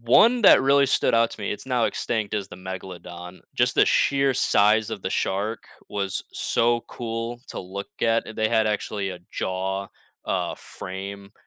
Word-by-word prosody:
one 225 - +5
that 130 - +8
really 140 +1 +5
stood - - +2
out 115 0 +4
to - - -10
me- 100 - -2
it's 105 - -7
now 125 -3 +1
extinct- 110 -3 -2
is 100 -2 -2
the - - -10
megalodon, 90 -1 -8
just - - +2
the - - +6
sheer 140 -1 +3
size 105 -2 +3
of 110 -4 -5
the 95 - -2
shark 105 +4 -1 0.3
was 100 -3 -2
so 120 0 +1
cool 115 0 -5
to - - -5
look 95 +2 -7
at, 115 0 +2
and 110 - -9
they 110 0 +2
had 110 -2 +2
actually 105 -2 -2
a 90 - -7
jaw, 95 +1 -2 0.4
uh, - - -1
frame 100 +2 -8
105 Hz, 180 wpm, -24 LUFS, 95-115 Hz, 0.4 s, that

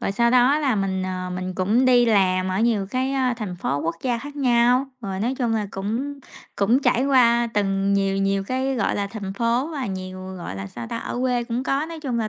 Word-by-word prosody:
Rồi 195 - -1
sau 235 +3 +2
đó 255 +4 +4
là 275 -6 +1
mình, 190 -1 -1
ờ, 185 -1 -4
mình 185 0 -4
cũng 210 +8 +2
đi 245 -1 +5
làm 185 -3 +2
ở 185 - -1
nhiều 225 -4 +1
cái, 260 +1 0
a, 255 -2 +1
thành 205 -6 -5
phố 145 -6 -2
quốc 165 +2 -2
gia 245 -3 0
khác 290 +3 -9
nhau, 250 0 +3
rồi 195 -3 -4
nói 245 +5 0
chung 240 -3 0
là 215 -2 -1
cũng 245 +9 -4 0.4
cũng 235 +7 +2
trải 255 +3 +2
qua 240 -3 +4
từng 195 -1 +1
nhiều 195 -1 +1
nhiều 195 0 0
cái, 260 +4 -1
gọi 230 - 0
là, 200 -1 -1
thành 200 -2 -6
phố 235 +7 0
và 275 -4 -3
nhiều, 185 -1 -6
gọi 95 - -6
là, 95 - -5
sao 115 +4 -8
ta, 230 - -4
ở - - -5
quê 250 -2 0
cũng 235 +1 -2
có, 275 +3 0
nói 325 -1 -8
chung 255 -6 -2
là 220 - -1
230 Hz, 240 wpm, -23 LUFS, 195-255 Hz, 0.4 s, đi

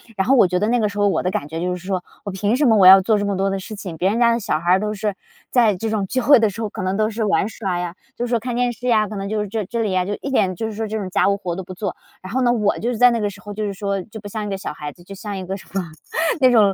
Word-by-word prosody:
然 190 -1 0
后 - - +6
我 200 - +6
觉 180 0 0
得 210 +3 +1
那 245 +1 +2
个 215 - +2
时 205 0 -7
候 205 0 +3
我 - - 0
的 180 - 0
感 145 -5 -3
觉 160 +1 -4
就 180 +1 -1
是 180 0 -10
说， 190 -2 -1 0.2
我 200 - -4
凭 200 +4 0
什 290 +3 +2
么 225 -4 +5
我 190 -2 +7
要 190 +1 +10
做 215 +3 +2
这 205 - -1
么 200 -1 -1
多 195 +1 +1
的 195 0 -2
事 215 +3 -8
情？ 185 -5 -7
别 185 +4 +2
人 220 +4 0
家 235 -1 +5
的 230 - 0
小 195 -7 -1
孩 175 +2 +2
儿 190 - +4
都 210 +1 -2
是 210 -1 -2 0.3
在 230 -5 +3
这 220 +5 -3
种 215 -2 0
聚 255 +6 -1
会 280 +1 +6
的 220 -1 +3
时 200 +3 -7
候， 220 - -2
可 - - -6
能 185 +1 -1
都 215 +1 +1
是 225 +1 -3
玩 200 -1 +2
耍 190 -6 -3
呀， 175 0 -4 0.2
就 240 - -2
是 - - -5
说 235 -1 +2
看 240 +1 -4
电 245 0 +1
视 245 +2 -6
呀， 215 -3 +3
可 210 - -7
能 195 0 -4
就 215 +1 -1
是 210 - -3
这 215 0 -3
这 230 +5 -3
里 210 - 0
呀 185 -1 +1 0.2
一 - - -4
点， 195 -8 +1
就 225 +5 -3
是 220 - -5
说 220 +1 -3
这 220 +1 -3
种 195 -3 -4
家 185 - +2
务 200 - +3
活 180 -3 -4
都 190 - -5
不 185 - -9
做， 195 0 -4 0.3
然 185 +1 -9
后 260 - 0
呢 245 -1 +3
我 210 -4 +1
就 235 - -1
是 245 - -2
在 245 +2 +7
那 235 - 0
个 205 -1 0
时 200 0 -12
候 205 +1 -8
就 215 +1 -4
是 200 - -3
说 200 -1 -2
就 220 +2 -10
不 205 - -9
像 210 +1 -4
一 - - -4
个 195 - -2
小 190 - -5
孩 150 -1 -6
子， 175 - -18
就 195 +3 -10
像 205 +1 -6
一 185 - -5
个 190 +2 -4
什 - - -14
么， 195 - 0 0.6
那 255 -1 +6
种 210 -5 +5
205 Hz, 400 characters per minute, -21 LUFS, 190-225 Hz, 0.6 s, 要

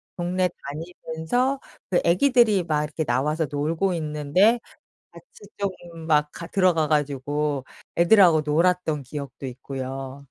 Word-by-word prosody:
동네 180 +1 0 0.2
다니면서 165 - -2 0.3
그 180 - +3
애기들이 215 +1 +4
막 155 -3 0
이렇게 150 +1 -3
나와서 150 +5 0
놀고 160 +6 0
있는데 155 +8 +2 0.5
같이 - - -15 0.3
좀 200 -1 0 0.4
막 150 -1 +3
가 170 - -8
들어가 180 -6 +2
가지고 145 -1 -1 0.3
애들하고 170 -2 +6
놀았던 160 -1 +1
기억도 140 0 -7
있고요. 135 +1 -6
160 Hz, 275 characters per minute, -24 LUFS, 145-180 Hz, 0.5 s, 애들하고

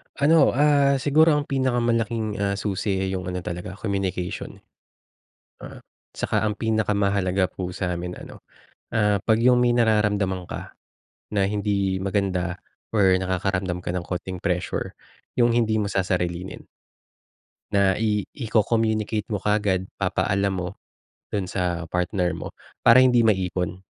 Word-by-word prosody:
Ano, 155 +1 +4
ah, 140 -1 +4
siguro 150 +3 +4
ang 145 - 0
pinakamalaking, 115 -5 0
ah, 100 0 0
susi, 100 0 -2
eh, 95 - -2
yung 95 -1 -4
ano 90 -1 -4
talaga, 90 +2 -6
communication. 95 -3 -3 1.1
Oo. - - -9 0.3
Saka - - -1
ang 105 -1 -1
pinakamahalaga 100 -4 +1
po 90 -1 -5
sa 90 -1 -2
'min 90 +1 -5
ano, - - -11 0.5
ah, 105 -2 +3
pag 110 +3 +2
yung 125 0 +5
may 120 -1 +3
nararamdaman 105 -5 +1
ka, - - -7 0.6
na 100 -1 +2
hindi 100 -2 0
maganda 95 -2 -1 0.3
or 95 -4 +4
nakakaramdam 95 -1 -1
ka 85 - -4
ng 90 -1 -3
kaunting 90 0 -4
pressure, 90 -1 -2 0.4
yung 120 -1 +3
hindi 110 -2 +2
mo 105 - -1
sasarilinin. 90 -2 -2 1.1
Na 100 -1 +2
i 105 -2 +1
iko-communicate 110 -2 0
mo 105 -3 -3
kaagad 100 -3 0
papaalam 100 0 0
mo, 90 -1 -3 0.6
dun 100 -2 -2
sa 90 -2 -2
partner 90 +1 -1
mo 80 - -6 0.3
para 115 - +6
hindi 125 -2 +4
maipon, 95 -5 0
100 Hz, 135 wpm, -24 LUFS, 90-110 Hz, 1.1 s, para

